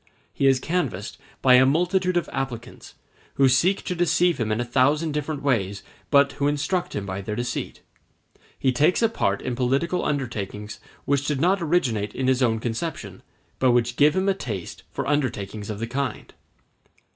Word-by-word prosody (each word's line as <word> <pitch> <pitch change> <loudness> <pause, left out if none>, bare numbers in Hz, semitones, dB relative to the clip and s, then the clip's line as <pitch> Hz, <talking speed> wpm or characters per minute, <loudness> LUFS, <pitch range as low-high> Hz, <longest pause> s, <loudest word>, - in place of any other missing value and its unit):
He 140 - +2
is 135 -1 +4
canvassed 130 - -3 0.2
by 130 - +6
a 125 +1 +8
multitude 180 +4 +1
of 175 - 0
applicants, 125 -2 -6 0.4
who 135 - +5
seek 165 +10 +2
to 180 - -2
deceive 175 -1 +2
him 110 -2 -1
in 110 - 0
a 120 - -1
thousand 140 +6 +2
different 150 0 -3
ways, 100 -8 0 0.3
but 140 -1 +5
who 140 +1 -1
instruct 150 +5 -1
him 100 - -3
by 95 0 -4
their 105 +2 -4
deceit. 120 +2 -4 0.7
He 130 - +1
takes 150 - +2
a 225 - +4
part 100 - -1
in 125 - -2
political 135 +8 0
undertakings 105 -7 -4 0.3
which 140 0 0
did 150 -3 0
not 185 +5 +2
originate 125 -11 0
in 130 - -2
his 130 0 +2
own 115 -3 +2
conception, 115 - -4 0.4
but 130 -2 +4
which 120 0 +1
give 150 +1 +4
him 190 +1 +1
a 195 - +4
taste 105 - -6
for - - -4
undertakings 110 -8 -2
of 105 - -4
the 115 - -3
kind. 135 +4 -4
135 Hz, 180 wpm, -24 LUFS, 115-155 Hz, 0.7 s, a